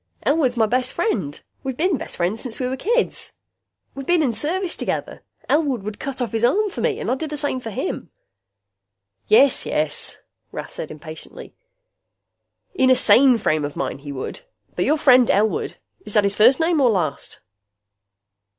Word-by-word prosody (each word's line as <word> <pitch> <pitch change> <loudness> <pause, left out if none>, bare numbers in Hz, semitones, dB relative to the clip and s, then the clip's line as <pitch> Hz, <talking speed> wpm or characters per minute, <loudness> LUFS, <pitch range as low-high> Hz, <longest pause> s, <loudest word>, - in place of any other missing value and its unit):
Elwood's 280 -5 +1
my 225 - +4
best 250 +3 -1
friend. 195 - -2 0.2
We 265 -1 -3
been 330 +3 0
best - - -6
friends 180 +6 -1
since 245 -4 -3
we 255 - -1
was 260 +1 -3
kids. 475 - 0 0.6
We 275 - -7
been 345 +2 +2
in 250 -5 0
service 340 - -1
together. - - -4 0.3
Elwood 280 -8 +1
would 210 0 -6
cut 270 -2 -3
off 230 - -4
his 225 0 -2
arm 405 - +2
for - - -6
me. 460 -2 0
And - - -2
I'd 260 - -1
do 320 - -3
the 300 0 -4
same 280 -2 0
for 230 - -7
him." 205 - -4 1.2
"Yes, 265 +5 +5
yes," 150 -1 -2 0.3
Rath - - -7
said - - -6
impatiently, 155 +1 -10 1.2
"in 260 -8 +3
a 255 - +6
sane 255 0 +6
frame 155 -8 0
of 145 0 -4
mind, - - -4
he 145 0 -7
would. 140 - -6 0.3
But - - 0
your 305 - +2
friend 255 -5 +5
Elwood 210 +2 +1 0.3
is 210 - -7
that 210 - +5
his 200 0 +2
first 240 +8 +5
name 325 -2 +2
or 255 - +5
last?" 180 -9 -2
255 Hz, 180 wpm, -21 LUFS, 210-300 Hz, 1.2 s, a